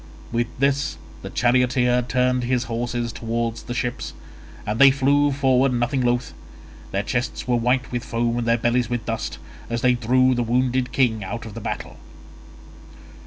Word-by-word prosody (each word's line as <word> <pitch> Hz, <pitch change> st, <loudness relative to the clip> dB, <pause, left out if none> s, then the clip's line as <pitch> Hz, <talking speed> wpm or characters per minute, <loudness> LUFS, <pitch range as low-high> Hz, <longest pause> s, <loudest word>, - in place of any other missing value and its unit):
With 120 Hz, 0 st, 0 dB
this 140 Hz, +1 st, +1 dB, 0.2 s
the -, -, -7 dB
charioteer 125 Hz, 0 st, +2 dB
turned 125 Hz, 0 st, +1 dB
his 125 Hz, 0 st, +1 dB
horses 120 Hz, 0 st, -3 dB
towards 115 Hz, 0 st, -3 dB
the 120 Hz, -, -6 dB
ships, 120 Hz, -, -3 dB, 0.5 s
and 105 Hz, +2 st, -2 dB
they 140 Hz, -, +9 dB
flew 140 Hz, +2 st, +3 dB
forward 135 Hz, -1 st, +3 dB
nothing 125 Hz, +3 st, 0 dB
loth. 120 Hz, 0 st, 0 dB, 0.6 s
Their 100 Hz, +1 st, -1 dB
chests 120 Hz, +3 st, -3 dB
were 125 Hz, -, +2 dB
white 125 Hz, +2 st, +1 dB
with 120 Hz, -1 st, -2 dB
foam 120 Hz, 0 st, -1 dB
and 120 Hz, -, -3 dB
their 115 Hz, 0 st, +3 dB
bellies 120 Hz, 0 st, +1 dB
with 120 Hz, -1 st, -3 dB
dust, 115 Hz, -1 st, -3 dB, 0.3 s
as 115 Hz, 0 st, -2 dB
they 125 Hz, -1 st, +4 dB
drew 130 Hz, +2 st, +3 dB
the 120 Hz, -, 0 dB
wounded 125 Hz, +2 st, 0 dB
king 115 Hz, -6 st, +1 dB
out 115 Hz, +5 st, -5 dB
of 110 Hz, -, -8 dB
the 115 Hz, -, -7 dB
battle. -, -, -5 dB
120 Hz, 165 wpm, -23 LUFS, 115-130 Hz, 0.6 s, they